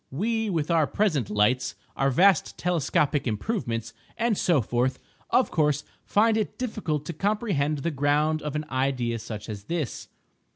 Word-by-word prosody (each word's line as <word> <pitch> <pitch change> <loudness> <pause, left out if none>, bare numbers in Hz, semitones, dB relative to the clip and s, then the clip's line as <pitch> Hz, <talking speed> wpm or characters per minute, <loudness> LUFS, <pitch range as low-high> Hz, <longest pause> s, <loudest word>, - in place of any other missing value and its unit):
We, 220 - -1
with 165 -3 -1
our 160 -3 +3
present 155 - 0
lights, 105 +5 +1 0.2
our 135 - +2
vast 185 +7 +3
telescopic 155 -4 +1
improvements, 115 - -2 0.2
and 230 -1 +1
so 175 -5 +3
forth, 125 +3 0 0.3
of 255 - +3
course 150 -2 +2 0.2
find 220 +1 +3
it 215 - -2
difficult 185 - -2
to 170 - -4
comprehend 190 -6 0
the 170 - 0
ground 150 +2 +1
of 150 -1 -4
an 150 0 -2
idea 130 -3 0
such 110 -2 -7
as 105 -3 -7
this. 165 -7 -3
150 Hz, 155 wpm, -26 LUFS, 130-190 Hz, 0.3 s, our